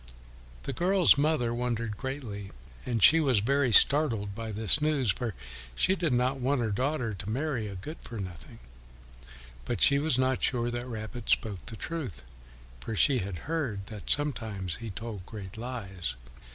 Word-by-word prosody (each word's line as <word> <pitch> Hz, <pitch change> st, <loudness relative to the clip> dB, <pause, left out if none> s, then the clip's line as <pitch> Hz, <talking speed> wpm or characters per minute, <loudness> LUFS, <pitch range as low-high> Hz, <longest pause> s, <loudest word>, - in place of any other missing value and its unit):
The 135 Hz, -, -3 dB
girl's 180 Hz, +5 st, +4 dB
mother 140 Hz, -5 st, +1 dB
wondered 115 Hz, -2 st, -2 dB
greatly, 115 Hz, -7 st, -6 dB, 0.4 s
and 115 Hz, -5 st, 0 dB
she 165 Hz, -, +8 dB
was 135 Hz, -7 st, +2 dB
very 130 Hz, +4 st, +2 dB
startled 115 Hz, -7 st, +6 dB
by 115 Hz, +1 st, -6 dB
this 110 Hz, +7 st, +4 dB
news, 145 Hz, -7 st, +2 dB
for 110 Hz, +1 st, -4 dB, 0.4 s
she 190 Hz, -, +3 dB
did 170 Hz, -5 st, -1 dB
not 125 Hz, +2 st, +1 dB
want 130 Hz, +2 st, +1 dB
her 110 Hz, -2 st, -1 dB
daughter 125 Hz, +1 st, -1 dB
to 100 Hz, +1 st, -7 dB
marry 130 Hz, -2 st, -2 dB
a 100 Hz, -, -7 dB
good 150 Hz, -, -8 dB
for 115 Hz, -, -8 dB
nothing; 90 Hz, -8 st, -8 dB, 1.1 s
but -, -, -3 dB
she 140 Hz, 0 st, +6 dB
was 150 Hz, -3 st, +1 dB
not 130 Hz, 0 st, +1 dB
sure 120 Hz, -2 st, 0 dB
that 120 Hz, +1 st, -4 dB
Rabbit 110 Hz, 0 st, -7 dB
spoke 100 Hz, -5 st, 0 dB
the 115 Hz, -, -6 dB
truth, 120 Hz, -, -6 dB, 0.6 s
for 105 Hz, -, -5 dB
she 130 Hz, +5 st, +4 dB
had 95 Hz, -3 st, -4 dB
heard 135 Hz, -12 st, -2 dB
that 105 Hz, -, -9 dB
sometimes 110 Hz, -, -1 dB
he 115 Hz, -1 st, -7 dB
told 105 Hz, 0 st, -7 dB
great 95 Hz, -4 st, -9 dB
lies. 100 Hz, -, -5 dB
120 Hz, 165 wpm, -29 LUFS, 105-140 Hz, 1.1 s, she